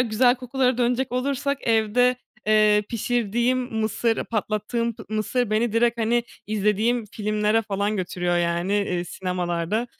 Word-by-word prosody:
güzel 245 +1 +3
kokulara 255 0 0
dönecek 245 +1 0
olursak, 275 +2 -1
evde, 230 +3 +3 0.3
eee, 215 -1 +4
pişirdiğim 240 +2 0
mısır, 225 -1 -1
patlattığım 225 +2 -2
pı - - -11
mısır 215 +2 -1
beni 220 +1 +1
direkt, 235 +1 +2
hani, 235 +1 +1 0.2
izlediğim 215 +3 +1
filmlere 215 +1 +1
falan 205 0 -1
götürüyor 180 -1 -1
yani, 170 +2 0
eee, 185 -4 0
sinemalarda. 180 +4 -2
220 Hz, 125 wpm, -24 LUFS, 205-240 Hz, 0.3 s, eee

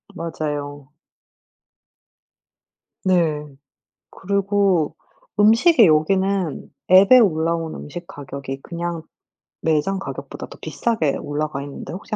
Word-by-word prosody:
맞아요. 145 -4 -5 2.1
네. 165 -6 +1 0.7
그리고 195 -5 0 0.4
음식이 230 - +6
여기는 185 +2 +1 0.2
앱에 195 +7 +8
올라온 165 -5 +1
음식 170 +4 -8
가격이 140 -2 -7
그냥 170 -1 -4 0.6
매장 160 +5 +1
가격보다 - - -7
더 - - -12
비싸게 190 -12 -1
올라가 145 -1 -3
있는데 140 +3 -8
혹시 205 +4 -5
170 Hz, 210 characters per minute, -21 LUFS, 150-195 Hz, 2.1 s, 앱에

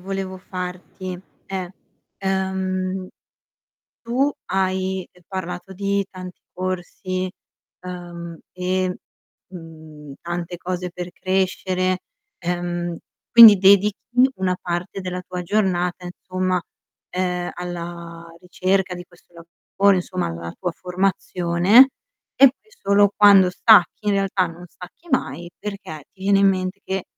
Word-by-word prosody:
volevo 190 0 -5
farti 185 0 -6 0.3
è: 190 -2 -4 0.5
ehm, 190 -1 -2 1.0
tu 255 +5 +1
hai, 190 0 -1
ehm, 180 - -24
parlato 180 -1 -6
di 200 +1 -1
tanti 185 -1 -10
corsi, 185 0 -4 0.5
ehm, 175 -2 -8
e, 185 0 -1 0.5
mhmm, 160 -4 -11
tante 175 0 -4
cose 180 +1 -4
per 180 0 -7
crescere, 185 -1 0 0.4
ehm, 175 -1 -3 0.3
quindi 230 -3 +11
dedichi 200 +2 +5 0.4
una 185 -1 0
parte 175 +2 -4
della 180 -1 -4
tua 180 0 -6
giornata, 180 -2 0
insomma, 185 0 -2 0.5
ehm, 180 -1 -2
alla 170 -1 -7 0.2
ricerca 185 +1 0
di 175 0 -9
questo 175 0 -24
lavoro, 170 +4 0
insomma, 185 0 -2
alla 85 0 -6
tua 180 -2 -2
formazione, 185 +5 +3 0.5
e 275 - +8
poi 275 +11 -20
solo 200 0 +3
quando 200 -3 +7
stacchi, 210 +1 +4
in - - +4
realtà 195 -2 +1
non 170 +1 -11
stacchi 180 - -14
mai, 175 -9 -1
perché 195 -7 -7
ti 190 - -20
viene 195 0 +4
in 200 - +5
mente 185 +1 -2
che 190 -1 -3
185 Hz, 115 wpm, -22 LUFS, 175-190 Hz, 1.0 s, quindi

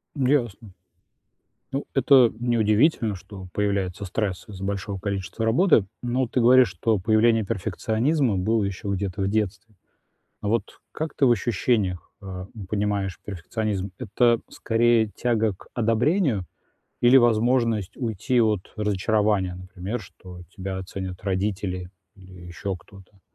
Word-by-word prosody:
Ясно. 120 -7 0 1.0
Ну, 135 +1 -2
это 135 -3 +6
неудивительно, 115 0 +2
что 95 0 -10
появляется 100 -2 -1
стресс 95 -1 -3
из-за 95 -3 -8
большого 100 0 -3
количества 100 +2 -3
работы, 115 - +4 0.2
но 125 +1 0
ты 125 - -1
говоришь, 125 0 +6
что 105 +5 0
появление 110 +3 +3
перфекционизма 110 - 0
было 110 +3 +1
ещё 100 0 -4
где-то 95 0 -3
в 95 - +1
детстве. 105 +1 -2 0.7
Вот 110 +3 -2
как 155 -1 -4
ты 140 - +3
в 120 - +5
ощущениях, 105 -4 0
э, 95 -1 -7 0.2
понимаешь 100 -2 -1
перфекционизм? 100 +1 -3
Это 120 +3 +2
скорее 115 0 +2
тяга 110 -1 0
к 95 - -17
одобрению 120 - +1 0.6
или 125 +2 +7
возможность 115 -3 +2
уйти 120 +1 0
от 105 -4 0
разочарования, 105 -2 +1
например, 95 +5 -6
что 90 -1 -12 0.2
тебя 95 0 -4
ценят 95 -1 -6
родители 95 -2 -2 0.2
или 95 -2 -14
ещё 95 +3 -4
кто-то? 95 +2 -16
105 Hz, 125 wpm, -24 LUFS, 95-115 Hz, 1.0 s, или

